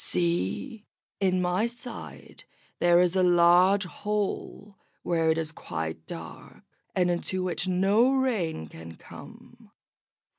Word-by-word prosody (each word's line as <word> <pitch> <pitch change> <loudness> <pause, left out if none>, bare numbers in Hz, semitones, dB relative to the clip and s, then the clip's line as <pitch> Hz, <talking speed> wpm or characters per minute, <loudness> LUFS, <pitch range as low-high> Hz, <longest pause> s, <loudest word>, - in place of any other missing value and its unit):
See! 90 - 0 0.3
in 185 -2 +1
my 180 +6 +1
side 240 0 -10 0.4
there 175 0 +5
is 180 0 +1
a 190 - +3
large 180 +2 +5
hole 205 +1 -4 0.2
where 165 -2 +1
it 160 - +2
is 160 -1 -2
quite 80 - -6
dark, 80 -1 -10 0.3
and 180 -1 +2
into 185 +2 -2
which 180 0 -2
no 195 +7 +3
rain 220 - -1
can 80 +2 -11
come. - - -14
180 Hz, 120 wpm, -27 LUFS, 160-200 Hz, 0.4 s, there